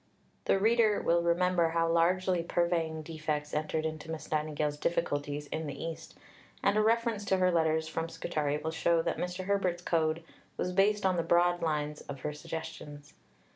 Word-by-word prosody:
The - - +3
reader 220 +1 +3
will 170 0 +2
remember 170 0 +2
how 165 0 +1
largely 175 +2 +2
purveying 165 -2 0
defects 150 -2 -3
entered 155 +1 -1
into 155 0 -5
Miss 160 -1 -6
Nightingale's 150 -1 -1
difficulties 145 -3 -1
in 160 -1 -3
the 140 -1 -6
East, 165 0 -6 0.5
and 200 - +3
a 215 - +4
reference 225 -1 +1
to 190 - +2
her 185 0 +3
letters 160 -1 +2
from 165 +1 -3
Scutari 155 -3 -2
will 160 +1 -3
show 165 0 +2
that - - -1
Mr. 180 +1 -3
Herbert's 185 -3 0
Code 160 -1 +1 0.3
was 180 - -1
based 205 +2 +3
on 185 -1 +2
the - - +2
broad 175 +1 +3
lines 150 -2 -1
of 140 -2 -8
her 150 - -3
suggestions. 150 -1 -8
165 Hz, 175 wpm, -31 LUFS, 155-180 Hz, 0.5 s, a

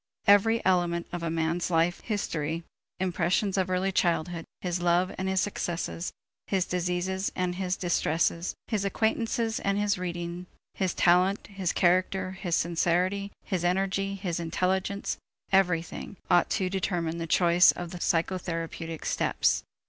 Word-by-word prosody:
Every 215 +3 +5
element 175 -2 +2
of 175 - -4
a 165 - -1
man's 165 +2 0
life 170 +1 +2
history, 165 -6 -2 0.4
impressions 185 +2 +1
of 190 -1 +1
early 185 +1 +1
childhood, 170 -2 0
his 175 -1 -2
love 175 +1 +2
and 190 0 -2
his 190 -1 +2
successes, 175 -3 -3 0.4
his 190 -2 +1
diseases 180 +2 -1
and 180 -1 0
his 185 0 -2
distresses, 170 0 0
his 210 -3 -1
acquaintances 225 +2 0
and 200 0 0
his 205 -2 +1
reading, 175 0 -4 0.3
his 190 -3 -1
talent, 180 +3 +3
his 195 -3 -2
character, 185 +1 +2
his 185 -3 -2
sincerity, 180 +4 +1
his 185 -4 -1
energy, 195 +2 0
his 180 -4 -3
intelligence 185 +4 -1 0.3
everything 180 0 +1
ought 175 - +5
to 190 -3 0
determine 175 -3 -1
the 165 - -3
choice 175 +2 +5
of 175 -1 -7
the 180 - -7
psychotherapeutic 165 -2 -2
steps. - - +1
180 Hz, 140 wpm, -28 LUFS, 170-190 Hz, 0.4 s, Every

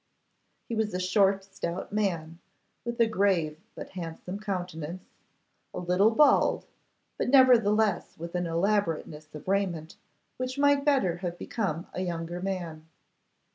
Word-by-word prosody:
He - - -5
was 220 -3 -1
a - - -1
short, 195 +1 +3
stout 190 -1 -5
man, 170 -6 -1 0.4
with 235 0 -5
a 230 - +6
grave 185 -8 +1 0.2
but - - -8
handsome 180 +2 -6
countenance, 180 -4 -4 0.7
a - - -4
little 180 +4 +3
bald, 280 +6 +4 0.5
but - - 0
nevertheless 220 -7 +4
with 170 +1 -7
an 180 -1 -1
elaborateness 165 -4 -1
of 150 - -10
raiment 185 -5 -1 0.4
which 255 +1 -3
might 285 0 +4
better 260 - +2
have 175 -1 -4
become 175 -7 -3
a 185 - -3
younger 175 -1 -4
man. 170 -5 -4
185 Hz, 135 wpm, -28 LUFS, 170-215 Hz, 0.7 s, a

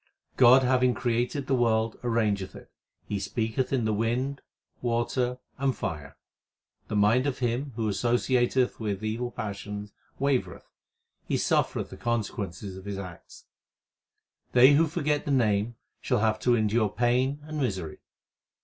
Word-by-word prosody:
God 130 +1 +7
having 125 -1 +3
created 120 +3 -1
the - - 0
world 115 -3 +2
arrangeth 105 -5 0
it; - - -13 0.3
He 105 - -3
speaketh 110 +5 -2
in 130 -5 +1
the 110 - +1
wind, 125 +6 -1 0.4
water, 120 +1 0 0.2
and 135 -4 0
fire. 75 -3 -5 0.7
The - - -3
mind 110 +6 +3
of 135 - -2
him 125 +3 -2
who 115 -2 -1
associateth 120 +4 +1
with 105 -2 -3
evil 115 +3 -2
passions 105 -1 -6 0.2
wavereth; 130 -10 -1 0.6
he - - +1
suffereth - - 0
the - - -9
consequences 100 -5 -3
of 95 - -11
his 100 -1 -4
acts. 90 -3 -10 1.1
They 130 +3 +8
who 160 +3 +4
forget 150 -1 -1
the - - -4
Name 115 -4 +2 0.2
shall - - 0
have 110 0 +1
to 120 -1 +3
endure 110 -1 +2
pain 125 +5 +1
and 155 0 -5
misery. 95 - -3
120 Hz, 140 wpm, -27 LUFS, 105-130 Hz, 1.1 s, They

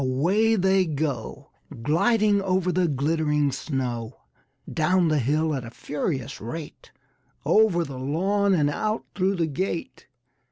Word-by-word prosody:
away 185 +13 +2
they 190 -1 +3
go 145 -7 -4 0.3
Gliding 205 - +3
over 185 -1 +1
the 180 0 +2
glittering 150 0 +1
snow, 125 -4 -4 0.5
Down 170 +2 +2
the 155 -1 +2
hill 155 +5 +1
at 135 -3 -3
a 115 - -8
furious 140 0 -4
rate, 150 +8 -8 0.6
Over 210 -6 +4
the 135 -5 -7
lawn 190 +8 +1
and 145 -3 +2
out 215 +7 -2
through 195 0 +1
the 170 -3 +1
gate. 165 +3 -4
160 Hz, 130 wpm, -25 LUFS, 140-190 Hz, 0.6 s, Over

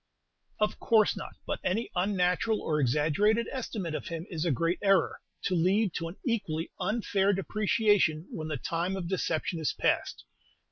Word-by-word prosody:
"Of 210 0 0
course 220 -2 +4
not; - - -7
but - - -2
any 220 +6 -1
unnatural 185 +3 +1
or 150 -1 -1
exaggerated 160 - +2
estimate 215 - -4
of - - -4
him 165 0 -5
is 165 -1 -2
a 170 - +2
great 165 +6 0
error, 195 -1 +2 0.2
to - - 0
lead 185 +3 +2
to 165 - -3
an 170 - -8
equally 170 - -1
unfair 205 -1 +1
depreciation 205 -4 +2
when 155 -1 -5
the 155 -2 -2
time 170 +7 -2
of 185 -3 -4
deception 170 -2 -1
is 155 - 0
past. - - 0
180 Hz, 160 wpm, -29 LUFS, 165-210 Hz, 0.2 s, course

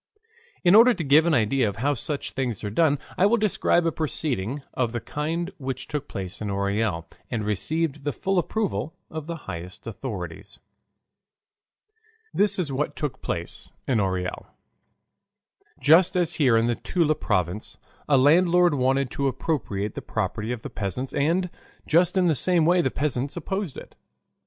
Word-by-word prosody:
In 175 0 +5
order 235 +3 +8
to 175 - -3
give 150 +3 +5
an 165 - +3
idea 120 0 +2
of 100 - -7
how 140 +6 +1
such 145 +2 -4
things 125 -6 -3
are 105 - -3
done 145 +4 +3 0.2
I 190 - +6
will 235 +3 +3
describe 200 -5 +2
a 165 - +2
proceeding 140 -5 -2
of 120 -2 -1
the 120 - -1
kind 165 - -3
which 135 -1 -4
took 145 -1 -4
place 95 0 -6
in 105 - -3
Orel, 100 -3 -1 0.2
and 110 -4 -2
received 150 - -1
the 145 - 0
full 190 +5 0
approval 190 -5 -2 0.2
of 155 -1 -6
the 170 - -3
highest 90 +2 -8
authorities. 100 -7 -6 1.8
This 205 0 +3
is 170 -6 -1
what 140 +3 -2
took 130 -4 -4
place 85 0 -4 0.2
in 125 -4 +2
Orel. 95 -2 -2 1.3
Just 165 +6 +5
as 175 -3 +1
here 125 -7 +3
in 115 - +3
the 120 - +2
Toula 165 -4 +1
province, 95 - -2 0.3
a 140 - +5
landlord 175 +5 +5
wanted 135 -1 +1
to 140 - -1
appropriate 120 -7 -2
the - - -6
property 110 +2 -3
of 125 -3 -5
the - - -6
peasants 105 +6 -3
and 165 +6 +1 0.4
just 175 +3 +3
in 185 - +4
the 165 - +4
same 170 +3 +2
way 175 +2 +4
the 130 - +1
peasants 140 +1 -2
opposed 190 -1 -3
it. - - -11
140 Hz, 165 wpm, -25 LUFS, 110-170 Hz, 1.8 s, order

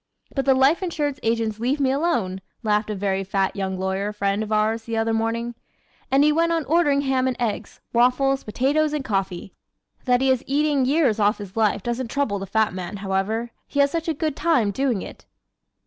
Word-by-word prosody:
But 270 -2 -1
the 270 -1 +5
life 270 +7 +4
insurance 295 -6 -2
agents 225 -1 -1
leave 260 +5 0
me 265 -2 +2
alone!" 245 - 0 0.2
laughed 210 0 +1
a 210 - -2
very 195 0 -1
fat 195 0 -1
young 190 -1 -2
lawyer 190 +2 -2
friend 200 0 -1
of 220 0 -4
ours 220 +1 +1
the 230 -1 -3
other 225 0 +1
morning 230 +1 -1 0.6
and 275 +2 +4
he 300 - +5
went 335 +2 +2
on 330 -3 0
ordering 295 -3 +3
ham 265 -2 +1
and 255 - -1
eggs, 230 -4 -3
waffles, 260 +3 +3
potatoes 285 +8 +1
and 290 -3 -2
coffee! 195 -2 -2 0.5
That 250 -1 +3
he 265 0 +3
is 260 -1 0
eating 285 -1 +2
years 270 -5 +2
off 210 +1 +3
his 200 -2 -9
life 215 -3 +1
doesn't 240 +1 -2
trouble 235 -7 -1
the 195 - -6
fat 220 +1 +1
man, 185 +2 -5
however. 200 +4 -2 0.2
He 285 - -3
has 280 0 +4
such 330 -1 -2
a 325 - 0
good 310 -1 -2
time 300 -11 +2
doing 250 -3 -1
it! - - -11
235 Hz, 205 wpm, -23 LUFS, 205-280 Hz, 0.6 s, the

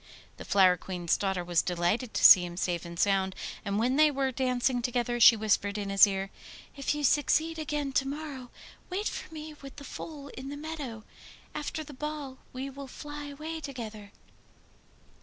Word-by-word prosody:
The - - -9
Flower 185 -2 +5
Queen's 175 -2 -1
daughter 190 -3 -1
was 175 -1 +2
delighted 180 +7 -1
to - - +3
see 180 - +10
him 175 0 -6
safe 175 -2 -1
and 170 0 -8
sound, 190 +1 +2 0.3
and 200 -1 -1
when 250 +5 +1
they 310 0 +6
were 270 -2 0
dancing 250 -1 0
together 240 0 -1
she 230 0 +9
whispered 210 -1 +1
in 200 -1 -3
his 195 +2 +8
ear: 195 0 -3 0.4
'If 275 +1 -1
you 295 - -3
succeed 315 +3 +2
again 295 -2 -2
to 270 +1 +2
morrow, 280 -3 -6 0.4
wait 395 +3 -2
for - - -5
me 310 -1 -7
with 275 -1 -10
the 285 - -10
foal 285 0 -8
in 265 +1 -8
the 285 - -6
meadow. 290 -8 -6 0.5
After 300 +1 -4
the 295 - -11
ball 290 -2 -5
we 260 +2 -5
will 275 0 -8
fly 295 +2 -8
away 310 +3 -6
together. 220 -8 -7
255 Hz, 180 wpm, -29 LUFS, 200-290 Hz, 0.5 s, see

